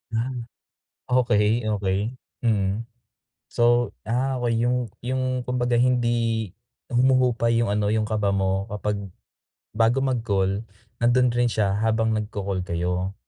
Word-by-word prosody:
Ah, 120 +4 -1 0.8
okey, 115 -2 +2
okey, 105 +3 -1 0.2
hmm. 105 -3 +1 0.7
So, 120 0 +3
ah, 130 +2 0
okey, 115 -1 +1
yung 125 +1 +2 0.3
yung 130 0 -1
kumbaga 125 -1 0
hindi, 120 -3 +1 0.4
humuhupa 125 -2 +3
yung 115 -2 +1
ano, 105 +1 +1
yung 110 -1 0
kaba 105 -2 +1
mo 95 0 0
kapag 105 -1 -3 0.8
bago 115 +4 +3
mag-call, 110 -5 0 0.3
nando'n 120 +1 +3
rin 120 0 +1
siya 100 -2 +1
habang 110 +1 +1
nag-ca-call 100 -3 -3
kayo. 90 +2 -2
115 Hz, 120 wpm, -24 LUFS, 105-120 Hz, 0.8 s, So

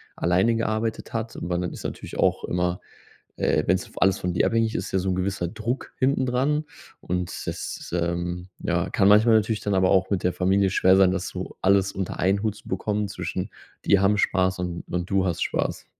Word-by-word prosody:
alleine 95 +7 +2
gearbeitet 110 0 -2
hat, 115 0 -4
weil 85 0 -1
dann 90 -1 -3
ist - - -9
natürlich - - -6
auch - - +2
immer 90 0 -1 0.6
äh, - - +1
wenn's 95 +1 +2
vo - - -8
alles 95 0 +3
von 90 - -2
dir 85 - +1
abhängig 115 -1 +1
ist, - - -4
ja 95 - +3
so 95 +1 -1
'n - - +1
gewisser 95 -2 -2
Druck 115 +5 -4
hinten 130 0 +2
dran 135 +5 +1 0.4
und 90 0 -3
das, - - -5
ähm, 85 +1 -2
ja, - - -1
kann 95 - +4
manchmal 110 +2 +6
natürlich 110 0 +1
dann 100 - -2
aber 95 -1 +3
auch 95 0 +3
mit 100 -3 -1
der 90 - +2
Familie 95 +2 +2
schwer 95 0 +4
sein, 95 -1 +5
das 95 0 -2
so 90 0 -7
alles 100 0 +3
unter 95 -1 -4
einen 100 +3 +1
Hut 110 -2 -1
zu - - -14
bekommen 105 -1 -1
zwischen: 90 +2 -4 0.3
Die 100 - +4
haben 100 +2 +3
Spaß 95 -2 +1
und 90 -1 -4
und 90 0 -3
du 95 -1 +2
hast 85 -3 -2
Spaß. - - -2
95 Hz, 210 wpm, -25 LUFS, 90-105 Hz, 0.6 s, manchmal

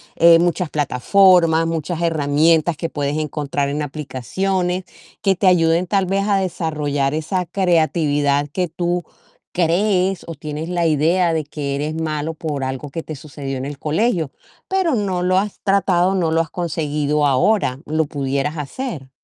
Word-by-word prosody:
eh, 165 0 +7
muchas 175 -1 0
plataformas, 165 +4 +3
muchas 165 +1 -3
herramientas 160 0 +2
que 165 - -3
puedes 145 0 -2
encontrar 145 -2 -2
en 150 +2 -2
aplicaciones 180 +6 -2 0.4
que 195 -1 +2
te 190 +2 +1
ayuden, 170 -1 +4
tal 195 -1 +1
vez 195 +2 0
a 200 -1 +3
desarrollar 150 -6 -1
esa 175 +4 -1
creatividad 155 -5 +1
que 180 +1 -1
tú 175 +1 -1 0.5
crees 185 +2 +1
o 165 - -6
tienes 150 +2 -6
la 175 -1 0
idea 165 +3 +2
de 160 -1 0
que 140 -1 -4
eres 150 +3 -3
malo 160 0 -3
por 150 -3 -4
algo 130 +2 -4
que 165 - -4
te 155 - -7
sucedió 140 -1 -6
en 130 - -4
el 145 0 -7
colegio, 160 - 0 0.4
pero 380 -6 +1
no 190 -4 -1
lo 185 +1 +3
has 205 0 -4
tratado, 190 -2 +2
no 170 -4 +1
lo 165 - +2
has 165 -2 -6
conseguido 150 -3 -1
ahora. 135 0 +2
¿Lo 155 0 +1
pudieras 140 +2 -2
hacer? 150 - -5
160 Hz, 160 wpm, -20 LUFS, 145-180 Hz, 0.5 s, eh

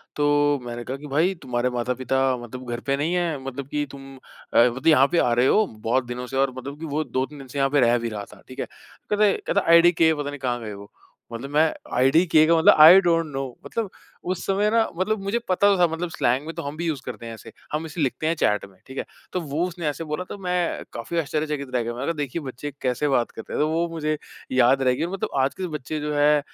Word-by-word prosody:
तो 145 -1 +2
मैंने 120 0 -6
कहा 130 +3 -5
कि, 150 +1 -10
"भाई 160 +7 +2
तुम्हारे 125 -1 -1
माता-पिता 125 +2 -1 0.2
मतलब 120 +1 -9
घर 120 - -3
पे 140 - +3
नहीं 160 +5 -1
है। 170 -4 0
मतलब 135 0 -6
कि 145 0 -2
तुम 135 -1 -11
अ, - - -8
मतलब 125 +5 +3
यहाँ 140 -3 +6
पे 175 - +2
आ 120 - +3
रहे 120 +2 +3
हो? 215 0 +4
बहुत 115 +4 -1
दिनों 125 +1 -6
से" 135 - -4
और 135 -1 +2
मतलब 140 +3 -7
कि 165 - -5
वो 155 +1 -1
2-3 135 +2 -3
दिन 135 - -10
से 140 - -8
यहाँ 135 0 +3
पे 145 0 +2
रह 120 0 +4
भी 115 0 -3
रहा 105 -2 -5
था। 100 - -17
ठीक 130 - -11
है। - - -1
कहता 210 0 -4
है, 200 - +4
कहता - - +2
"आईडीके 170 -1 +6
पता 145 -1 -3
नहीं 145 - -7
कहाँ 125 -2 -1
गए 105 -2 -6
वो?" 100 0 -11 0.4
मतलब 120 +4 -6
मैं 155 +1 +3 0.2
आईडीके 155 +5 +4
का 165 0 +4
मतलब 160 - +7
आई 170 +5 +10
डोंट 165 -2 +2
नो। 135 0 -2 0.2
मतलब 225 -3 -3 0.4
उस 185 - -7
समय 200 +2 +2
ना 230 -1 +3
मतलब 210 +3 0
मुझे 200 +4 0
पता 195 +2 +3
तो - - 0
था। 175 - +5
मतलब 170 +1 -3
स्लैंग 130 0 0
में 165 - -6
तो - - -4
हम 145 +2 -6
भी 170 0 -1
उसे 145 -5 -3
करते 115 - -7
हैं 115 - -6
ऐसे। 110 - -11 0.2
हम 155 +2 -1
इसे 160 +1 -5
लिखते 145 +3 -1
हैं 165 - +1
चैट 105 -8 +1
में 95 -1 -19
ठीक 130 - -10
है। - - -2 0.3
तो 180 - -1
वो 155 +3 -1
उसने 175 -3 -5
ऐसे 150 +3 -3
बोला 180 - -2
तो - - -6
मैं 180 -1 -1
काफ़ी 120 +9 -5
आश्चर्यचकित 150 -2 -2
रह 120 - +1
गया। 120 +1 -4
मैंने 125 +3 -4
कहा 170 - +1
देखिए 145 +5 -4
बच्चे 140 +2 -6
कैसे 130 +4 0
बात 125 -4 +1
करते 110 - -9
हैं। - - -2
तो 150 - +3
वो 165 +2 0
मुझे 155 -2 -2 0.3
याद 130 +1 +4
रहेगी 130 +4 +1
मतलब 195 +1 -3
आज 135 - 0
के 185 - -4
बच्चे 150 +3 -5
जो 150 0 -3
है 150 +1 +4
145 Hz, 260 wpm, -24 LUFS, 125-165 Hz, 0.4 s, आई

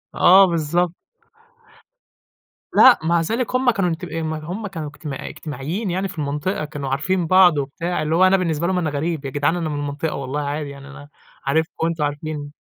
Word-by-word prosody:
آه 190 +2 +7
بالضب 170 +1 0 1.8
لأ 260 - +7
مع 170 +1 +2
ذلك، 230 +8 -2
هُم 255 -1 +3
كانوا 195 -4 0
انتب 165 +1 -4
إم 160 0 -3
هُم 180 +8 -5
كانوا 160 -6 -6
اجمت 145 -4 -6
اجتماعيين 160 +8 -5
يعني 190 +2 -1
في 170 - -11
المنطقة، 150 +3 -2
كانوا 140 -2 -5
عارفين 165 +6 0
بعض 185 -4 +6
وبتاع، 155 +4 -2
اللي 155 +1 0
هو 185 - +4
أنا 195 +1 +4
بالنسبة 170 -2 -1
لهم 185 -1 0
أنا 165 -3 0
غريب، 150 0 -3
يا - - -2
جدعان 145 +4 0
أنا 165 -3 -2
من 145 - -3
المنطقة 145 +2 -3
والله 140 +2 -3
عادي، 145 0 -3
يعني 140 0 -11
أنا 145 +1 -12 0.4
عارفكم 160 +4 0
وأنتم 165 -2 -1
عارفين 145 0 -4
160 Hz, 185 wpm, -21 LUFS, 145-180 Hz, 1.8 s, آه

